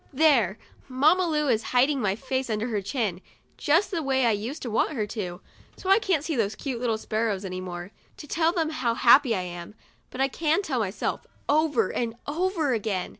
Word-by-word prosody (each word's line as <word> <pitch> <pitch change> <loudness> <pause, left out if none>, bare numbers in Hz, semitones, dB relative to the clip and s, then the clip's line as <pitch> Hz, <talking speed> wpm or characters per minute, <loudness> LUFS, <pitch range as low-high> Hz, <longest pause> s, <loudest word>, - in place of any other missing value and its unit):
There! 255 - +3 0.3
Mamma 305 +8 +3
Lu 300 -2 0
is 225 -4 +2 0.2
hiding 270 +2 +3
my 195 -3 +1
face 260 +2 -3
under 220 +2 -1
her 210 -3 -1
chin, 200 -3 -2 0.3
just 330 +8 +2
the 340 -4 -1
way 265 -3 +1
I 230 - +4
used 225 +9 -4
to 240 - -4
want 225 - +1
her 220 -7 -1
too, 185 -4 -5 0.4
so 380 - -2
I 395 - +7
can't 360 -9 0
see 315 -1 -2
those 220 -4 0
cute 250 -4 -4 0.2
sparrows 215 -3 -2
any 185 -1 -4
more, 175 +1 -7 0.3
to - - -9
tell 320 +2 +1
them 325 -3 -1
how 240 -7 -1
happy 245 0 +5
I 185 - -1
am. 175 +2 -8 0.3
But 255 - -9
I 270 - +3
can 320 +7 0
tell 270 -9 -1
myself, 200 -2 -3 0.2
over 290 -8 +2
and 235 -1 -2
over 325 -2 0
again. 210 -5 -2
250 Hz, 200 wpm, -26 LUFS, 210-300 Hz, 0.4 s, I